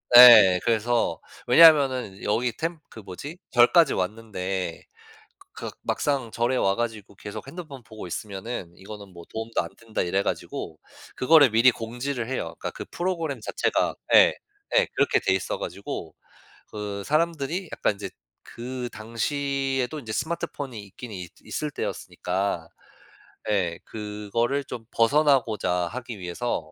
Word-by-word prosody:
네. 110 -7 +10
그래서 115 -6 +1 0.3
왜냐하면은 135 -11 +6
여기 120 +4 +1
템 165 0 -3
그 - - -11
뭐지? 110 - -8
절까지 130 +6 +5
왔는데 95 -3 -3 0.7
그 - - -6
'막상 135 -5 -1
절에 120 +3 0
와 95 -5 +2
가지고 110 -3 -4
계속 105 +4 -8
핸드폰 145 -3 -9
보고 110 -3 -10
있으면은 95 0 -5
이거는 100 0 -10
뭐 85 -1 -11
도움도 110 +1 -2
안 - - -7
된다.' 115 -1 -5
이래 95 +2 0
가지고 - - -4 0.4
그거를 145 0 +6
미리 115 +4 +6
공지를 120 +2 -4
해요. 85 -11 -3
그러니까 - - -4
그 - - -8
프로그램 165 -7 -2
자체가 - - 0 0.2
예. - - +8 0.4
예 - - +5
그렇게 - - +3
돼 95 - +2
있어 95 - -2
가지고 - - -6 0.5
그 105 -1 -5
사람들이 165 +3 0
약간 - - 0
인제 100 -1 -6 0.4
그 125 +1 -6
당시에도 135 +4 -2
이제 115 -5 -7
스마트폰이 140 -4 -4
있긴 110 +4 -10
있 90 -3 -7
있을 150 -1 -3
때였으니까 90 -8 -3 0.8
예. 90 -5 0
그거를 110 +6 -2
좀 120 -3 -7
벗어나고자 130 -5 +3 0.2
하기 120 -1 -6
위해서 90 -2 -3
115 Hz, 305 characters per minute, -25 LUFS, 100-135 Hz, 0.8 s, 네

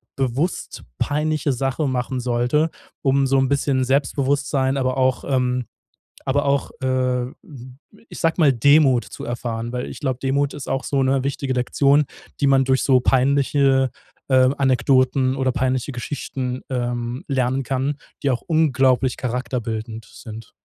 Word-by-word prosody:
bewusst 135 +6 -2 0.2
peinliche 150 -1 0
Sache 135 +3 -1
machen 130 0 -2
sollte, 125 +6 +1 0.3
um 135 0 +2
so 135 +1 +2
'n 135 - +2
bisschen 140 -2 +1
Selbstbewusstsein, 135 0 +1
aber 130 -1 0
auch, 130 -1 +1
ähm 125 -2 0 0.6
aber 145 +2 +1
auch, 140 0 0
äh, 130 -1 0 0.8
ich - - -9
sage 165 -1 +2
mal, 150 -5 +5
Demut 135 0 +4
zu - - -9
erfahren. 120 -1 -4
Weil 125 0 -3
ich - - -9
glaube, 130 -4 -1
Demut 140 +1 0
ist 145 - -7
auch 135 0 -1
so 140 -1 0
'ne 135 0 +1
wichtige 140 -1 -2
Lektion, 140 +4 +3 0.4
die 140 - +3
man 135 -1 +4
durch 130 0 +2
so 130 -2 +4
peinliche, 135 0 +2 0.4
äh, 130 -1 +5
Anekdoten 130 0 +2
oder 130 -1 0
peinliche 130 +1 -1
Geschichten, 125 0 -4
ähm, 120 0 -3
lernen 130 -1 0
kann, 135 +3 -1 0.3
die 140 - +1
auch 125 - -1
unglaublich 135 -5 +2
charakterbildend 115 -3 -4
sind. 110 0 -11
130 Hz, 145 wpm, -21 LUFS, 125-140 Hz, 0.8 s, mal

